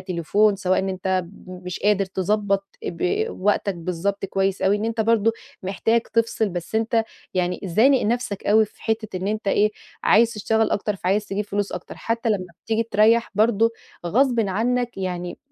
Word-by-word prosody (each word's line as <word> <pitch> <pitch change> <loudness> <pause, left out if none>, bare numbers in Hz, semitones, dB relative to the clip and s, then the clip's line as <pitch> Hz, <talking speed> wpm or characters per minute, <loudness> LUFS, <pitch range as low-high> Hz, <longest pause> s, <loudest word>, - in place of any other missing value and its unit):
تليفون، 195 +3 +1
سواء 185 0 +1
إن 190 - -1
أنت 185 -1 -1 0.2
مش 180 0 -7
قادر 205 -1 +3
تضبط، 195 +1 0 0.2
آآ، - - -2
ب 405 - -1
وقتك 200 0 +1
بالضبط 180 +4 -2
كويِّس 195 0 -1
أوي 195 +2 +3
إن 210 - -3
أنت 225 0 -1
برضه 225 0 +3 0.3
محتاج 210 +5 +1
تفصل، 230 -2 0
بس 175 +3 -6
أنت 225 0 +2 0.3
يعني، 180 -1 0
زانق 235 +9 +4
نفسك 220 -3 -2
أوي، 220 +2 +5
في 215 - -17
حتة 220 -3 -2
إن 185 - -3
أنت 210 -1 -2
إيه، 210 +2 +3 0.3
عايز 230 +1 +5
تشتغل 220 +1 +1
أكتر، 205 0 -1
فعايز 195 +3 0
تجيب 200 +2 -2
فلوس 205 0 -2
أكتر. - - -7
حتى 230 +1 -2
لمّا 200 -4 0 0.2
بتيجي 225 0 +1
تريح 230 +1 +3
برضه، 225 +2 +3 0.4
غصبًا 235 0 +2
عنك 240 +4 0
يعني، 180 -2 -4
205 Hz, 170 wpm, -23 LUFS, 190-225 Hz, 0.4 s, أوي